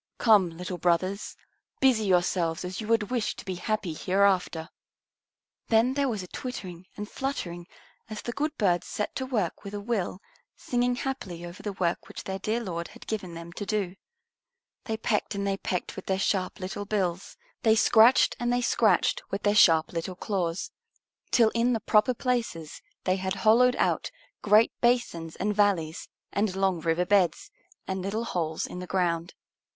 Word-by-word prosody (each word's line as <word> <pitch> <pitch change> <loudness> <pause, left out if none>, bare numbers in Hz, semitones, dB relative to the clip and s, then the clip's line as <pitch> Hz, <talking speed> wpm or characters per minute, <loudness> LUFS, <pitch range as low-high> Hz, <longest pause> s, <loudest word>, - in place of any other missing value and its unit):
Come, 210 -6 +5
little 180 0 -5
brothers, 185 +4 0 0.4
busy 250 -5 +4
yourselves 175 -2 +1
as 185 +4 -5
you 215 - -6
would 225 0 +1
wish 240 -4 0
to - - -10
be 190 - -3
happy 185 -1 -2
hereafter." 185 -2 +1 1.0
Then 230 +3 +3
there 280 -1 +1
was 215 -5 -3
a - - -9
twittering 185 -8 -7
and 210 0 -5
fluttering 180 -11 -4 0.4
as 215 -1 -6
the 240 - -3
good 300 +5 -2
birds 180 -5 +1
set 210 - -3
to 260 - -3
work 215 -10 -2
with 200 +1 -7
a - - -3
will, 200 -4 -2 0.4
singing 245 0 0
happily 205 -11 -4
over 175 +1 -9
the 205 - -4
work 175 -3 -1
which - - -8
their 190 0 -4
dear 220 +5 -1
Lord 170 -4 -4
had - - -14
given 190 -6 -4
them 170 +1 -9
to 205 - -5
do. 200 -3 -2 0.9
They 220 -1 -2
pecked 215 -2 -1
and 200 0 -2
they 195 -1 0
pecked 180 -2 -3
with 190 - -8
their 190 - +1
sharp 190 -1 0
little 190 +2 -5
bills; 190 - -2 0.2
they 220 -2 +4
scratched 225 +2 +5
and 240 0 0
they 245 0 +1
scratched 240 - +2
with 195 - -4
their 205 - +3
sharp 165 -6 +5
little 170 +2 -3
claws, 180 -3 -2 0.6
till 230 -3 +5
in 235 +2 +1
the 225 - 0
proper 220 +4 +3
places 230 - -2 0.2
they 185 0 +1
had 190 +1 -2
hollowed 250 +3 +6
out - - 0 0.3
great 210 +2 +5
basins 235 -10 +1
and 210 +2 -1
valleys 185 -6 +1 0.2
and 200 -2 0
long 190 -2 +1
river 165 +2 +1
beds, 185 -5 +2 0.4
and 190 0 -2
little 205 +5 -2
holes 165 -8 -2
in 180 - -7
the 180 - -7
ground. 175 -2 -1
195 Hz, 175 wpm, -27 LUFS, 180-225 Hz, 1.0 s, hollowed